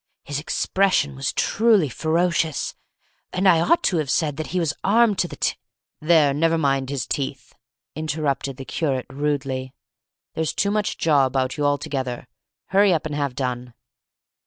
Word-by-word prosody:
His 145 0 -4
expression 160 -2 +1
was 135 0 -2
truly 215 -7 +3
ferocious, 165 +2 0 0.6
and 190 +2 +1
I 170 -3 +6
ought 335 - +3
to 180 - +2
have 150 -4 -1
said 150 +1 +1
that 155 - -4
he 180 - -1
was 160 -4 0
armed 210 -1 +3
to 175 - +2
the - - -9
t - - 0 0.3
" - - -62
"There, 155 -3 +4
never 165 +3 +2
mind 135 -3 0
his 140 -3 -2
teeth," 140 -1 -4 0.4
interrupted 150 -3 -2
the 135 - -8
curate, 135 -5 -2
rudely; 135 -2 -2 0.6
"there's 160 -2 -1
too 200 - +1
much 210 0 -1
jaw 145 -4 +3
about 130 0 -1
you 145 -1 +1
altogether. 135 -3 -2 0.4
Hurry 200 +1 +4
up 160 -3 0
and 155 - -4
have 140 -3 -2
done." 125 -2 -4
150 Hz, 165 wpm, -23 LUFS, 135-170 Hz, 0.6 s, I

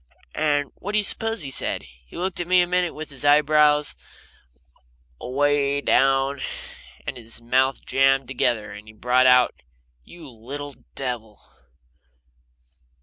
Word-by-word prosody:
And 145 -2 0
what 205 +3 -7
do - - +2
you 210 - +2
suppose 225 +1 0
he 135 - -6
said? - - -2
He 60 0 -16
looked 180 +1 -3
at 175 - -3
me 180 0 +4
a - - +2
minute 180 0 -1
with 155 0 -8
his 135 -1 -7
eyebrows 150 0 +4 1.2
away 140 +2 +1
down, 135 0 +2 0.6
and - - -5
his 115 -1 -5
mouth 130 +3 0
jammed 135 -1 +2
together, 120 -4 -1
and - - -8
then 105 - -18
he 110 - -13
brought 125 +3 +2
out: 125 -1 +4 0.4
"You 165 - -13
little 140 +4 -8 0.2
devil!" 120 -5 -5
135 Hz, 145 wpm, -23 LUFS, 125-150 Hz, 1.2 s, me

